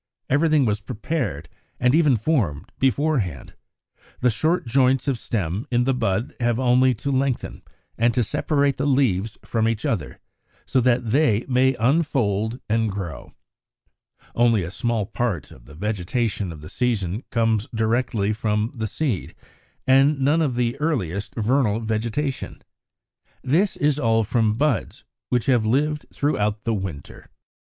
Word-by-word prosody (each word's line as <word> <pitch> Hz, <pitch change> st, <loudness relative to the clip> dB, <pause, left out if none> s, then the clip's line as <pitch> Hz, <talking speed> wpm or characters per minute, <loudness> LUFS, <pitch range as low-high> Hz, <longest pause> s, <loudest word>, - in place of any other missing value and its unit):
Everything 150 Hz, 0 st, +3 dB
was 105 Hz, -2 st, 0 dB
prepared, 105 Hz, -, -3 dB, 0.3 s
and 125 Hz, +1 st, +3 dB
even 150 Hz, -4 st, +4 dB
formed, 105 Hz, -, -1 dB
beforehand: 130 Hz, -, 0 dB, 0.7 s
the 125 Hz, -, +3 dB
short 155 Hz, +11 st, 0 dB
joints 130 Hz, +2 st, +2 dB
of 130 Hz, -4 st, 0 dB
stem 100 Hz, -1 st, -3 dB
in 120 Hz, 0 st, +2 dB
the 135 Hz, +2 st, +1 dB
bud 110 Hz, -1 st, -1 dB
have 120 Hz, -1 st, +1 dB
only 125 Hz, 0 st, +4 dB
to 140 Hz, +6 st, -3 dB
lengthen, 135 Hz, -1 st, -1 dB, 0.4 s
and 120 Hz, +1 st, +4 dB
to 125 Hz, -, +3 dB
separate 145 Hz, +2 st, 0 dB
the 140 Hz, -, 0 dB
leaves 115 Hz, -7 st, +1 dB
from 115 Hz, -1 st, 0 dB
each 115 Hz, -1 st, -1 dB
other 90 Hz, -9 st, -2 dB, 0.5 s
so 130 Hz, -, +1 dB
that 120 Hz, -2 st, +1 dB
they 125 Hz, -5 st, +2 dB
may 130 Hz, 0 st, +3 dB
unfold 120 Hz, -4 st, +1 dB
and 110 Hz, 0 st, +1 dB
grow. 85 Hz, -9 st, -7 dB, 1.0 s
Only 115 Hz, -4 st, +3 dB
a 85 Hz, -, -5 dB
small 110 Hz, +2 st, -1 dB
part 100 Hz, -, -3 dB
of -, -, -15 dB
the 75 Hz, -, -14 dB
vegetation 105 Hz, +1 st, -2 dB
of 75 Hz, -2 st, -10 dB
the 75 Hz, -, -9 dB
season 110 Hz, -5 st, -1 dB
comes 115 Hz, -1 st, +1 dB
directly 110 Hz, -2 st, 0 dB
from 105 Hz, +1 st, -1 dB
the 110 Hz, -4 st, -3 dB
seed, 120 Hz, -, -3 dB, 0.5 s
and 135 Hz, +2 st, +4 dB
none 145 Hz, +5 st, +3 dB
of 140 Hz, -6 st, 0 dB
the 120 Hz, 0 st, 0 dB
earliest 105 Hz, -, -2 dB
vernal 115 Hz, -1 st, +1 dB
vegetation. 115 Hz, +5 st, -3 dB, 0.8 s
This 170 Hz, +9 st, +1 dB
is 150 Hz, 0 st, +1 dB
all 115 Hz, -4 st, +2 dB
from 110 Hz, 0 st, +1 dB
buds 145 Hz, -3 st, -1 dB, 0.3 s
which 125 Hz, -2 st, +1 dB
have 125 Hz, -5 st, +3 dB
lived 150 Hz, +7 st, 0 dB
through 145 Hz, -5 st, -1 dB, 0.2 s
the 115 Hz, -, 0 dB
winter. 95 Hz, -8 st, -5 dB
54. -, -, -25 dB
120 Hz, 145 wpm, -23 LUFS, 105-135 Hz, 1.0 s, even